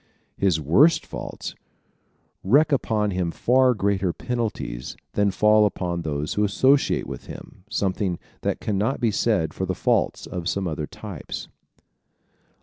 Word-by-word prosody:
His 95 -5 +2
worst 145 - +4
faults - - -6 0.9
wreak 145 +10 +4
upon 110 -6 +1
him 90 -2 -1
far 125 +6 +3
greater 100 -3 +1
penalties 110 - -4 0.2
than 100 0 +2
fall 105 +2 +4
upon 90 -3 -3
those 75 -2 -2
who 105 - +1
associate 130 +7 +3
with - - -8
him, 90 - -11
something 95 -5 -1 0.2
that - - -1
can 100 -3 -1
not 115 +7 0
be 115 -3 +2
said 100 -7 +1
of 95 - -1
the 95 - -1
faults - - +1
of 90 0 -4
some 100 -2 -1
other 75 -2 -3
types. - - -7
100 Hz, 145 wpm, -24 LUFS, 90-115 Hz, 0.9 s, worst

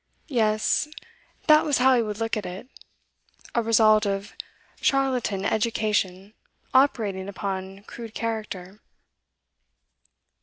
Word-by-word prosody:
Yes, 215 +3 +2 0.6
that 305 -1 +6
was 290 -3 +1
how 260 +1 +5
he 240 - +3
would 210 -2 -4
look 225 +1 -1
at 215 - -3
it. 185 +7 -8 0.9
A 235 - +2
result 215 -2 +4
of 195 0 -3 0.5
charlatan 255 -8 +1
'education' 210 -3 0 0.4
operating 210 -8 +2
upon 195 0 -5
crude 225 +1 -10
character. 210 -4 -4
215 Hz, 105 wpm, -25 LUFS, 200-235 Hz, 0.9 s, that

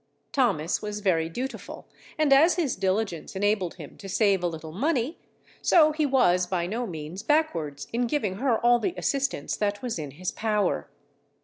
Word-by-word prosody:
Thomas 195 - +1
was 210 0 -4
very 165 -5 +1
dutiful, 260 +10 -6 0.3
and 305 -3 +4
as 315 +6 +6
his 320 -8 0
diligence 190 -2 -2
enabled 200 -2 0
him 155 -5 -11
to 195 - -9
save 200 -1 +2
a 175 - +1
little 160 -1 -6
money, 270 - -1 0.4
so 310 -3 +5
he 305 -1 0
was 180 -10 +3
by 175 -2 -1
no 230 +6 -3
means 160 +2 -6
backwards 165 - 0
in 240 +1 +1
giving 215 -9 -1
her 245 -1 +2
all 240 0 +6
the 350 +7 -2
assistance 275 - -1
that 205 +2 -1
was 235 -8 -3
in 150 -2 -5
his 185 +1 -2
power. 210 -2 0
210 Hz, 175 wpm, -26 LUFS, 180-265 Hz, 0.4 s, as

